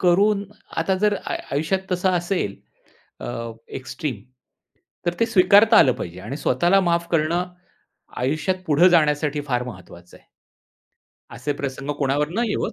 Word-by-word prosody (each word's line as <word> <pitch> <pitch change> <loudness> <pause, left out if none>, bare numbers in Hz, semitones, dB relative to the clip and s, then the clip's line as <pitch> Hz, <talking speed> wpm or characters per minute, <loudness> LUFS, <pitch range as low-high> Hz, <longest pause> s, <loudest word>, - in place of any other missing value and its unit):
करून 200 +3 +3 0.3
आता 190 - +1
जर 210 0 +2
आय - - -2
आयुष्यात 160 +7 0
तसं 180 +1 +1
असेल 175 - -2 0.7
अ, 115 0 -5 0.3
एक्सट्रीम 130 -4 -5 0.8
तर 175 - +1
ते 230 - +4
स्वीकारता 210 +2 +5
आलं 130 - +6
पाहिजे 90 -6 -7
आणि 115 +8 -6
स्वतःला 175 +8 +2
माफ 170 -2 0
करणं 170 +3 0 0.7
आयुष्यात 155 +8 -1
पुढे 160 +4 +5
जाण्यासाठी 150 -3 +2
फार 125 -2 0
महत्वाचं 90 -6 -12
आहे. - - -29 1.1
असे 145 +4 -3
प्रसंग 135 +1 -4
कोणावर 145 +1 +1
न 215 +7 -1
येवोत. - - -2
155 Hz, 135 wpm, -22 LUFS, 130-185 Hz, 1.1 s, आलं